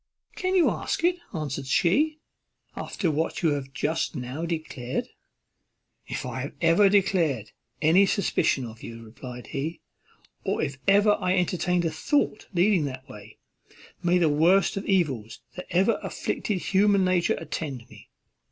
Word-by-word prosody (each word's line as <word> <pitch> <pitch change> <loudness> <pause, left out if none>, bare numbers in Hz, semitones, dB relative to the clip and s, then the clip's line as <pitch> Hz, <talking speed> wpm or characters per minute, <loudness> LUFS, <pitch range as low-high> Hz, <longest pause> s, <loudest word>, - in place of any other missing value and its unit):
"Can 370 +1 -1
you 360 - +5
ask - - -3
it," 350 +1 +3
answered 140 -5 -4
she, 290 - +2 0.6
"after 175 -6 -2
what 160 +4 -2
you 165 - +4
have 140 -2 -2
just 155 +6 -1
now 130 +6 -4
declared?" 155 -7 -4 1.0
"If - - -4
I 130 +3 -4
have 175 +4 +5
declared 170 - +1 0.3
any 180 +6 +5
suspicion 145 -10 +1
of 115 -1 -10
you," 115 0 -9
replied 125 +2 -9
he, 155 +5 -3 0.6
"or - - -1
if 135 -1 -4
ever 205 +1 +5
I 185 0 +1
entertained 180 0 +1
a 165 - 0
thought 220 - 0
leading 180 -3 +3
that 130 -1 -6
way, 105 -1 -12 0.6
may 175 0 +3
the 170 -2 +3
worst 170 +8 +3
of 195 - -4
evils 140 - 0
that 180 - -7
ever 190 +6 +2
afflicted 210 -4 -2
human 195 +1 +3
nature 185 -1 +2
attend 140 -6 -5
me! - - -16
165 Hz, 145 wpm, -26 LUFS, 135-195 Hz, 1.0 s, you